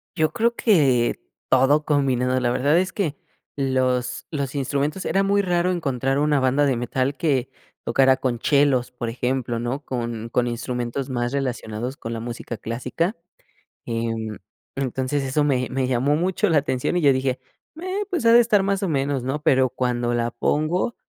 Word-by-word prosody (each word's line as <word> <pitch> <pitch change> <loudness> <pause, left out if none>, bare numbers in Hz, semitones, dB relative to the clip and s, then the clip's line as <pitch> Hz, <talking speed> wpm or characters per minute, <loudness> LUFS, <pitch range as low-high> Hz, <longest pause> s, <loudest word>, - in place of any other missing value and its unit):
Yo 155 -3 +1
creo 235 +3 +1
que 140 - +3 0.3
todo 135 +4 +4
combinado. 130 -3 +1
La 125 -1 +1
verdad 145 +6 +2
es 185 0 -1
que 165 -8 -1 0.4
los 130 -2 0
los 140 -2 -3
instrumentos 145 +5 -1
era 195 - +2
muy 200 +1 +2
raro 180 -1 +1
encontrar 135 -5 -1
una 150 -1 +2
banda 130 +2 +2
de 135 -2 +2
metal 130 +3 -1
que 135 -6 0 0.3
tocara 130 +2 +3
con 120 -3 -2
chelos, 135 -3 +2
por 120 -2 -4
ejemplo, 125 0 -2
¿no? 125 +5 -3
Con 115 -2 -4
con 120 +1 +1
instrumentos 120 +2 -3
más 120 -1 -1
relacionados 125 -2 -3
con 115 - -6
la 115 - -4
música 115 0 -6
clásica, 125 - -2 0.7
em, 115 -2 -3 0.4
entonces 135 +1 -1
eso 135 +3 +1
me 130 -3 +1
me 130 0 0
llamó 130 +3 +1
mucho 185 +5 +1
la 160 -3 +4
atención, 130 +2 -1
y - - +2
yo 140 -2 +6
dije: 130 -1 -1 0.4
"Eh, 375 +3 -2
pues, 350 - -1
ha 230 - +7
de 235 - +8
estar 215 -4 +3
más 195 0 0
o 195 - 0
menos, 140 -3 0
¿no?" 135 +4 -3
Pero, 130 -4 +4
cuando 120 -1 -1
la 120 0 0
pongo, 155 - 0
135 Hz, 175 wpm, -23 LUFS, 125-150 Hz, 0.7 s, de